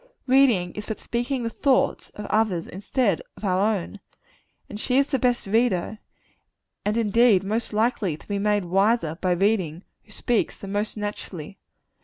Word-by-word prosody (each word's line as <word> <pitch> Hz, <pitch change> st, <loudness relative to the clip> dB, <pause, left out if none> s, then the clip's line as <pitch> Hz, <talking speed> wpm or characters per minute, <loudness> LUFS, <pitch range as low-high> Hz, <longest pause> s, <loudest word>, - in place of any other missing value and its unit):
Reading 250 Hz, -10 st, +3 dB
is 210 Hz, -, -7 dB
but 220 Hz, -, -4 dB
speaking 245 Hz, +2 st, -2 dB
the 230 Hz, -, -2 dB
thoughts 270 Hz, +1 st, +1 dB
of 210 Hz, -, -6 dB
others 205 Hz, -7 st, +1 dB
instead 200 Hz, -, -1 dB, 0.2 s
of -, -, -7 dB
our 185 Hz, -1 st, +2 dB
own; 195 Hz, +2 st, -6 dB, 0.7 s
and 210 Hz, -, -8 dB
she 250 Hz, +3 st, +1 dB
is 275 Hz, -, +5 dB
the 270 Hz, -2 st, -1 dB
best 245 Hz, -1 st, +1 dB
reader 215 Hz, -1 st, +1 dB, 0.8 s
and 210 Hz, +2 st, 0 dB
indeed 225 Hz, -2 st, +4 dB
most 220 Hz, +4 st, -2 dB
likely 210 Hz, -6 st, 0 dB
to -, -, -19 dB
be 200 Hz, -1 st, -2 dB
made 205 Hz, -1 st, +1 dB
wiser 190 Hz, -2 st, +1 dB
by 185 Hz, -1 st, +2 dB
reading 185 Hz, -3 st, 0 dB, 0.2 s
who 215 Hz, -, -22 dB
speaks 235 Hz, +1 st, -1 dB
the 200 Hz, -, -9 dB
most 205 Hz, +3 st, -2 dB
naturally. 200 Hz, -4 st, -6 dB
210 Hz, 165 wpm, -24 LUFS, 190-235 Hz, 0.8 s, is